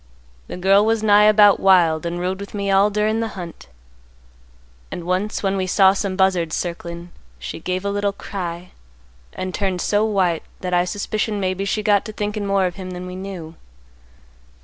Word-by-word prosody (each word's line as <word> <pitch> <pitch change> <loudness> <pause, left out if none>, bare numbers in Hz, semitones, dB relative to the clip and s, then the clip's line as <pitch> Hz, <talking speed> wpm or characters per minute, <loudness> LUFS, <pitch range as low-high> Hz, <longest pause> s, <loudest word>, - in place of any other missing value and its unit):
"The - - -7
girl 195 +3 +4
was 220 0 +1
nigh 210 -1 +6
about 210 -1 +6
wild 170 -4 +4
and 175 +1 -4
rode 185 +2 -2
with 200 +1 -8
me 200 -1 -1
all 195 +2 +4
durin' 210 +2 0
the 225 - -1
hunt, 170 - -8 1.2
and 175 - -6
once 185 +5 -2
when 195 0 +1
we 190 -1 -1
saw 190 0 +5
some 195 -1 -2
buzzards 185 -4 +1
circlin', 170 0 -5 0.3
she - - -7
gave 185 +3 -3
a 200 - 0
little 205 0 0
cry 180 -3 -6 0.6
and 185 0 -5
turned 190 -2 -1
so 205 +4 +1
white 190 -6 +1 0.2
that 180 -1 -3
I 175 0 +3
suspicioned 210 +2 -2
maybe 190 0 -1
she 210 +2 -1
got 205 -2 +3
to 215 - -7
thinkin' 210 0 -3
more 195 -1 +2
of 180 +1 -3
him 185 -1 -7
than 180 0 -7
we 180 0 -7
knew. 185 -4 -7
190 Hz, 185 wpm, -21 LUFS, 180-205 Hz, 1.2 s, nigh